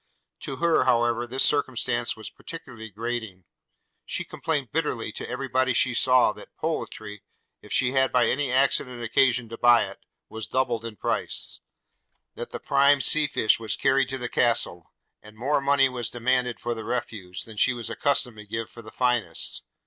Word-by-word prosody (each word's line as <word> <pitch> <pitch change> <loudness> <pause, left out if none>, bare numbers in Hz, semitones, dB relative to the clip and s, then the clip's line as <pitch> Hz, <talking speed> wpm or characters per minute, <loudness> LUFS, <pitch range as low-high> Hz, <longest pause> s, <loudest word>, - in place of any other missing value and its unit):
To - - -5
her, 170 -5 +2
however, 120 -1 +2
this 130 +3 +2
circumstance 120 -5 +1
was 110 - -8
particularly 125 -9 -10
grating. 110 -3 -5 0.6
She - - -3
complained 145 -6 -3
bitterly 140 -8 -1
to - - -6
every 135 +2 -4
body 130 0 +1
she 120 - +2
saw, 125 -2 +4
that - - -14
poultry, 110 -9 -4 0.4
if - - -15
she 130 -1 +2
had 130 0 +2
by 125 -1 +4
any 135 +3 0
accident 125 -2 +1
occasion 125 0 +2
to 115 - -8
buy 120 -1 +6
it, - - -10 0.3
was 110 -1 -6
doubled 125 -3 -1
in 115 -2 -6
price; - - -3 0.7
that - - -7
the - - -6
prime 140 0 +4
sea 155 +2 +4
fish 110 -5 +2
was 110 -1 -2
carried 135 -1 +2
to 135 - -3
the 125 -1 -4
Castle; 115 -9 0 0.3
and 105 0 -15
more 140 +5 +1
money 140 0 +4
was 125 -3 -3
demanded 125 0 0
for 120 0 -2
the 110 -1 -7
refuse, 105 -6 -4
than 110 -2 -12
she 130 - +4
was 120 -2 -5
accustomed 125 -5 0
to 105 -1 -11
give 110 +2 -4
for 120 - -11
the 110 - -12
finest. 125 -2 0
120 Hz, 180 wpm, -26 LUFS, 115-130 Hz, 0.7 s, buy